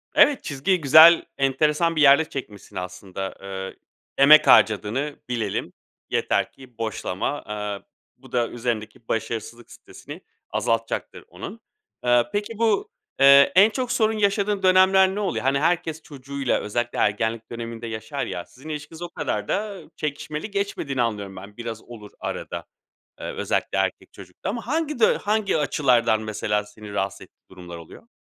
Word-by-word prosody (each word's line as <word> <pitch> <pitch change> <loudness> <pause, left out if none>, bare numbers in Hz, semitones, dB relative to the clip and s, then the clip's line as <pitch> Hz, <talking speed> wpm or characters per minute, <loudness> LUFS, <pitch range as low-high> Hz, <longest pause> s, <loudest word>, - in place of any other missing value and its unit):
Evet, 290 -3 +5
çizgiyi 160 +5 0
güzel, 160 +4 +8
enteresan 150 +5 +1
bir 155 - +1
yerde 140 +2 +7
çekmişsin 105 -7 -8
aslında. 90 +1 -6
Eee, 95 -1 -6 0.4
“Emek 150 +3 +7
harcadığını 115 +7 +3
bilelim. 115 -5 -2 0.4
Yeter - - 0
ki 130 -3 -17
boşlama.” 115 +3 -3
Eee, 105 -1 -4 0.4
bu - - -17
da 120 -1 +1
üzerindeki 115 0 -4
başarısızlık 115 +1 -4
stresini - - -12 0.3
azaltacaktır 115 0 -2
onun. 195 - -9 0.4
Eee, 120 -1 +4
peki 210 +1 -3
bu, 225 -3 +1 0.3
eee, 140 +1 +7
en 200 +4 +7
çok 250 +2 -3
sorun 220 -1 +1
yaşadığın 200 -1 +1
dönemler 190 +1 +5
ne - - -2
oluyor? 195 -4 -2
Hani, 135 +1 +2
herkes 160 -1 0
çocuğuyla 140 -2 -3
özellikle 120 +3 -3
ergenlik 110 +2 0
döneminde 115 0 -6
yaşar 110 -1 -4
ya. 90 - -5
Sizin 135 +5 -14
ilişkiniz 155 +2 -7
o 175 - -5
kadar 105 -9 -3
da 205 -3 -2
çekişmeli 150 +5 -5
geçmediğini 200 -10 -2
anlıyorum 105 -4 -2
ben. 100 +3 -11
Biraz 115 -2 -6
olur 105 -4 -12
arada, - - -5 0.5
eee, - - -7
özellikle - - -2
erkek - - -2
çocukta 95 - -8
ama 230 +2 -5
hangi 300 -1 -1
du - - +4
hangi 210 -4 +1
açılardan 125 -7 +2
mesela, 105 -1 -1
seni 105 0 -12
rahatsız 95 -2 -2
ettiği - - -18
durumlar 90 -2 -10
oluyor? 85 - -14
135 Hz, 145 wpm, -23 LUFS, 110-175 Hz, 0.5 s, güzel